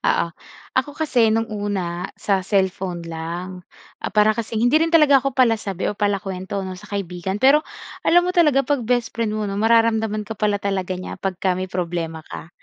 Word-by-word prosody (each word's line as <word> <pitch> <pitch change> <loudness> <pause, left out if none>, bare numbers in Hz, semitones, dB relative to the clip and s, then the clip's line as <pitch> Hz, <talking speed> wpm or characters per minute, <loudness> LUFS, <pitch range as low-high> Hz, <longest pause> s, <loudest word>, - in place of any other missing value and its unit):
Oo. - - +2 0.5
Ako 285 +3 -1
kasi 250 -8 +2
nung 225 +1 +2
una 190 -4 -3
sa 195 -2 0
cellphone 190 -3 -1
lang, 170 +3 -6 0.4
ah, - - -1
para 210 0 +4
kasing 225 0 -2
hindi 300 +6 +4
rin 330 - +2
talaga 300 -5 +6
ako 275 -1 -3
palasabi 220 -7 +1
o - - 0
palakuwento 195 -1 -2
'no, 185 - -5
sa 180 - -13
kaibigan. 190 -1 -3
Pero, 275 +5 +6 0.4
alam 350 +1 +4
mo 360 - 0
talaga 295 -6 +4
'pag 285 0 0
bestfriend 230 -2 -1
mo 215 - -2
'no, 195 - -3
mararamdaman 225 -1 +2
ka - - -4
pala 210 -1 +1
talaga 190 -2 -2
niya 185 - -6
pagka 190 -1 -1
may 185 +1 -4
problema 170 -3 -3
ka. 160 - -8
205 Hz, 180 wpm, -21 LUFS, 185-235 Hz, 0.5 s, talaga